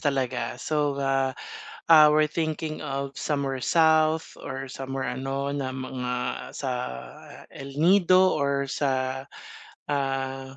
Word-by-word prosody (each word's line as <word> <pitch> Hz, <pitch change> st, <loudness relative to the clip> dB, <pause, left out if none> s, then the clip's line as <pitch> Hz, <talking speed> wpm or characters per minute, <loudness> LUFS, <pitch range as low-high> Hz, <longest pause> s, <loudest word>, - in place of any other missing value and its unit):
talaga. 130 Hz, -4 st, -1 dB
So, 145 Hz, +1 st, -1 dB
ah, 135 Hz, -1 st, 0 dB, 0.5 s
ah, 155 Hz, -2 st, +9 dB
we're 155 Hz, 0 st, +3 dB
thinking 155 Hz, -1 st, -3 dB
of 140 Hz, 0 st, -4 dB
somewhere 140 Hz, -3 st, -2 dB
south 160 Hz, +1 st, +3 dB
or 135 Hz, 0 st, -6 dB
somewhere 135 Hz, 0 st, -4 dB
ano 135 Hz, +2 st, -3 dB
na 140 Hz, -2 st, -2 dB
mga 125 Hz, -1 st, -4 dB, 0.4 s
sa, 135 Hz, -2 st, -3 dB, 0.8 s
El 135 Hz, +1 st, -9 dB
Nido 185 Hz, +2 st, +5 dB
or 140 Hz, -1 st, 0 dB
sa, 130 Hz, -1 st, -1 dB, 0.7 s
ah, 135 Hz, -1 st, -2 dB
135 Hz, 115 wpm, -26 LUFS, 130-155 Hz, 0.8 s, ah